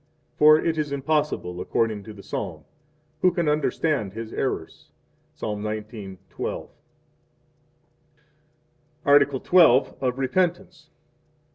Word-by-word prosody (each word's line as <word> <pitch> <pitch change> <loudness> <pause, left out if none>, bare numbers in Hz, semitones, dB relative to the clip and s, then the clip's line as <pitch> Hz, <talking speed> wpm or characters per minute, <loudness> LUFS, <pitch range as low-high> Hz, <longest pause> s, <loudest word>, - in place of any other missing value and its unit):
For 155 +1 +7
it 160 0 -1
is 150 -2 -2
impossible 140 - -1
according 110 +2 -1
to 110 - -9
the 100 -1 -13
Psalm: - - -5 0.6
Who 185 - +5
can 170 -2 -1
understand 150 -7 0
his 115 0 -7
errors? 105 -11 -4 0.5
Ps. - - -16
19:12. 105 -2 -5 2.4
Article 140 -2 +4
XII. 165 -8 +5
Of 125 -1 -1
Repentance. 175 +3 -1
135 Hz, 100 wpm, -24 LUFS, 110-155 Hz, 2.4 s, For